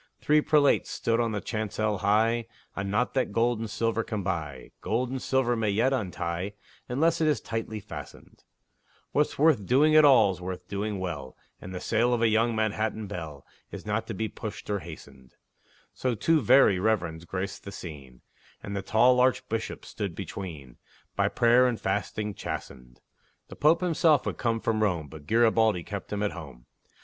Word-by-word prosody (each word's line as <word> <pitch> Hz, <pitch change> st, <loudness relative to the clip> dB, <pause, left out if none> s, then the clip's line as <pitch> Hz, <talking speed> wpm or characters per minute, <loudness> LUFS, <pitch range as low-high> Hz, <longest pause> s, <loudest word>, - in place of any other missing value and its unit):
Three 150 Hz, +1 st, +3 dB
prelates 150 Hz, -2 st, +3 dB
stood 115 Hz, 0 st, 0 dB
on 115 Hz, -2 st, +1 dB
the 105 Hz, -2 st, -3 dB
chancel 110 Hz, -2 st, -2 dB
high: 115 Hz, +3 st, +2 dB, 0.3 s
A 100 Hz, -, -3 dB
knot 105 Hz, +5 st, 0 dB
that 130 Hz, -5 st, 0 dB
gold 115 Hz, +2 st, +1 dB
and 115 Hz, -1 st, -4 dB
silver 115 Hz, +1 st, -1 dB
can 105 Hz, -3 st, -4 dB
buy, 75 Hz, -9 st, -4 dB
Gold 125 Hz, +3 st, -1 dB
and 130 Hz, -1 st, -3 dB
silver 130 Hz, -2 st, +1 dB
may 110 Hz, -2 st, 0 dB
yet 115 Hz, +7 st, +2 dB
untie, 90 Hz, -4 st, -3 dB, 0.4 s
Unless 160 Hz, +7 st, +1 dB
it 155 Hz, -, +3 dB
is 150 Hz, -6 st, +2 dB
tightly 110 Hz, -1 st, -4 dB
fastened; -, -, -11 dB, 0.7 s
What's 150 Hz, +1 st, +1 dB
worth 150 Hz, -8 st, +4 dB
doing 150 Hz, +5 st, +4 dB
at 155 Hz, -, +8 dB
all's 100 Hz, -10 st, +5 dB
worth 90 Hz, 0 st, -6 dB
doing 100 Hz, +1 st, -3 dB
well, 85 Hz, -8 st, -5 dB, 0.2 s
And 95 Hz, -, -8 dB
the 90 Hz, -, -5 dB
sale 120 Hz, +4 st, +1 dB
of 115 Hz, -, -3 dB
a -, -, +5 dB
young 115 Hz, +1 st, +2 dB
Manhattan 110 Hz, 0 st, -1 dB
belle 80 Hz, -8 st, -7 dB, 0.2 s
Is -, -, -9 dB
not 110 Hz, +2 st, -2 dB
to -, -, -5 dB
be 110 Hz, -, -2 dB
pushed 105 Hz, 0 st, -8 dB
or 100 Hz, -, 0 dB
hastened; 70 Hz, -6 st, -12 dB, 0.6 s
So 125 Hz, -2 st, -1 dB
two 160 Hz, +8 st, +2 dB
Very 115 Hz, -5 st, +5 dB
Reverends 90 Hz, -6 st, 0 dB
graced 95 Hz, +2 st, -5 dB
the 100 Hz, -, -8 dB
scene, 70 Hz, -9 st, -10 dB, 0.4 s
And 100 Hz, -, -5 dB
the 100 Hz, -, -2 dB
tall 120 Hz, +6 st, +4 dB
Archbishop 120 Hz, -3 st, 0 dB
stood 100 Hz, -6 st, -5 dB
between, 80 Hz, -10 st, -7 dB, 0.4 s
By -, -, +2 dB
prayer 120 Hz, +2 st, +4 dB
and 120 Hz, -3 st, -2 dB
fasting 105 Hz, -1 st, -2 dB
chastened. 60 Hz, -8 st, -7 dB, 0.5 s
The -, -, -9 dB
Pope 155 Hz, +4 st, +3 dB
himself 160 Hz, -5 st, +3 dB
would -, -, 0 dB
have -, -, -18 dB
come 115 Hz, -2 st, 0 dB
from 110 Hz, -1 st, 0 dB
Rome, 85 Hz, -8 st, 0 dB
But 75 Hz, -2 st, -12 dB
Garibaldi 110 Hz, -4 st, +3 dB
kept 100 Hz, 0 st, -7 dB
him 105 Hz, 0 st, -1 dB
at 105 Hz, -, 0 dB
home. 70 Hz, -8 st, -10 dB
110 Hz, 180 wpm, -27 LUFS, 95-120 Hz, 0.7 s, at